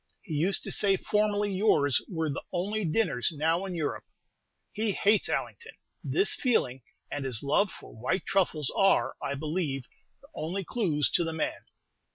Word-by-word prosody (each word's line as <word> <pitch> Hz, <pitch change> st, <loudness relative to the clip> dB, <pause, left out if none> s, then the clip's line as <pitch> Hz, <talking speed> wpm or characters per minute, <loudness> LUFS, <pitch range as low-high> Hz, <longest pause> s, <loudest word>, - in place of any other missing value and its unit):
He 170 Hz, -, -7 dB
used 170 Hz, +7 st, +2 dB
to -, -, -3 dB
say 195 Hz, -2 st, +3 dB
formerly 210 Hz, 0 st, +1 dB
yours 185 Hz, -9 st, +3 dB
were 160 Hz, -4 st, -1 dB
the 140 Hz, -, -4 dB
only 205 Hz, +4 st, -1 dB
dinners 160 Hz, -, +1 dB
now 165 Hz, +4 st, 0 dB
in 185 Hz, -2 st, -5 dB
Europe. 155 Hz, -3 st, -3 dB, 0.7 s
He 215 Hz, -1 st, -1 dB
hates 205 Hz, +2 st, +2 dB
Allington. 460 Hz, -1 st, -3 dB, 0.3 s
This 390 Hz, -, +2 dB
feeling, 135 Hz, -, +1 dB, 0.3 s
and 145 Hz, -, -3 dB
his 130 Hz, -3 st, -2 dB
love 170 Hz, +9 st, +2 dB
for -, -, -12 dB
white 125 Hz, +11 st, -1 dB
truffles, 165 Hz, -7 st, +1 dB
are, 195 Hz, 0 st, +3 dB
I 140 Hz, -, -2 dB
believe, 150 Hz, -2 st, -2 dB, 0.4 s
the 280 Hz, -, -19 dB
only 180 Hz, -, -3 dB
clews 170 Hz, -, 0 dB
to 175 Hz, -, +3 dB
the 165 Hz, -1 st, -3 dB
man. 160 Hz, -, -3 dB
175 Hz, 165 wpm, -29 LUFS, 150-205 Hz, 0.7 s, say